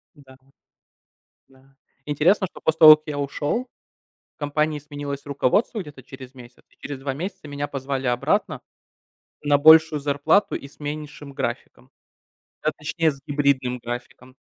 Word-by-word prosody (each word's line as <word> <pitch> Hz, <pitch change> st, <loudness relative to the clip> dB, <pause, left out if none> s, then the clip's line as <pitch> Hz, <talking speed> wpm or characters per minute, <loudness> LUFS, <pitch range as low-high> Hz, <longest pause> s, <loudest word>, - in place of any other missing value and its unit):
Да, 135 Hz, -2 st, -17 dB, 1.1 s
да. 135 Hz, 0 st, -25 dB, 0.3 s
Интересно, 165 Hz, +7 st, +2 dB
что -, -, -14 dB
после 160 Hz, 0 st, 0 dB
того, 155 Hz, -1 st, +11 dB
как 155 Hz, +1 st, -29 dB
я 145 Hz, -1 st, -4 dB
ушёл, 145 Hz, -, -2 dB, 0.7 s
в -, -, -66 dB
компании 150 Hz, +1 st, -1 dB
сменилось 145 Hz, -1 st, -7 dB
руководство 145 Hz, -, 0 dB
где-то 145 Hz, -6 st, -12 dB
через 130 Hz, -1 st, -12 dB
месяц 125 Hz, -1 st, -15 dB
и -, -, -28 dB
через 140 Hz, -2 st, -7 dB
2 135 Hz, 0 st, -3 dB
месяца 185 Hz, +3 st, -7 dB
меня 145 Hz, 0 st, -4 dB
позвали 135 Hz, -1 st, -4 dB
обратно 120 Hz, 0 st, 0 dB, 0.8 s
на 145 Hz, -1 st, +3 dB
большую 160 Hz, +1 st, +6 dB
зарплату 145 Hz, +7 st, +1 dB
и 140 Hz, -, -7 dB
с 140 Hz, -, -21 dB
меньшим 150 Hz, -1 st, -7 dB
графиком. -, -, -5 dB, 0.7 s
А 155 Hz, -, +1 dB
точнее, 160 Hz, +1 st, 0 dB
с 135 Hz, -, -15 dB
гибридным 140 Hz, -3 st, 0 dB
графиком. 125 Hz, +1 st, -8 dB
145 Hz, 145 wpm, -23 LUFS, 135-155 Hz, 1.1 s, того